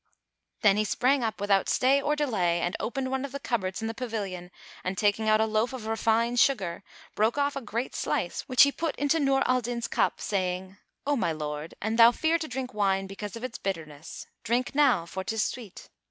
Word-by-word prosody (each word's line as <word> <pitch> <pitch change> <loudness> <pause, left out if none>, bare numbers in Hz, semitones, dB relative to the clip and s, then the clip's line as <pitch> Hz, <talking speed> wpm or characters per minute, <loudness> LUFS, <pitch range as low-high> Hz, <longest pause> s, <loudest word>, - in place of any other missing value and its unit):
'" - - -51
Then 205 -1 +5
he 215 - +2
sprang 255 +5 +1
up 220 -2 -2
without 200 -1 +2
stay 270 +2 +3
or 300 +2 +1
delay 200 - +1
and 175 +1 -1
opened 260 +2 -3
one 265 0 -1
of 280 - -5
the 280 - -5
cupboards 225 -6 -2
in - - -1
the 225 - -3
pavilion 205 -7 -5 0.3
and 185 +1 -3
taking 215 +1 +2
out 215 0 +5
a 220 - +3
loaf 220 +3 0
of 250 -4 -6
refined 230 +2 +1
sugar, 195 -10 +1 0.3
broke 220 +5 +1
off 285 0 +1
a 275 - -3
great 235 +1 -4
slice - - -2
which 255 0 +7
he 280 - +4
put 325 +1 -3
into 290 +3 +1
Nur 275 -2 +2
al 255 0 +2
Din's 235 0 -3
cup, - - 0
saying, 185 -1 -2 0.3
"O 290 +1 +2
my 210 -10 0
lord, 150 0 -5
an 220 +1 -1
thou 230 0 +8
fear 320 +6 +1
to 315 - -4
drink 255 -1 -5
wine, 195 -2 +1
because 195 +2 -7
of 230 - -8
its 255 -3 -5
bitterness, 160 -5 -6 0.2
drink 245 +4 0
now, 270 - +3
for 190 +3 -5
'tis 220 +3 -1
sweet." 235 -6 -6
225 Hz, 215 wpm, -27 LUFS, 195-260 Hz, 0.3 s, thou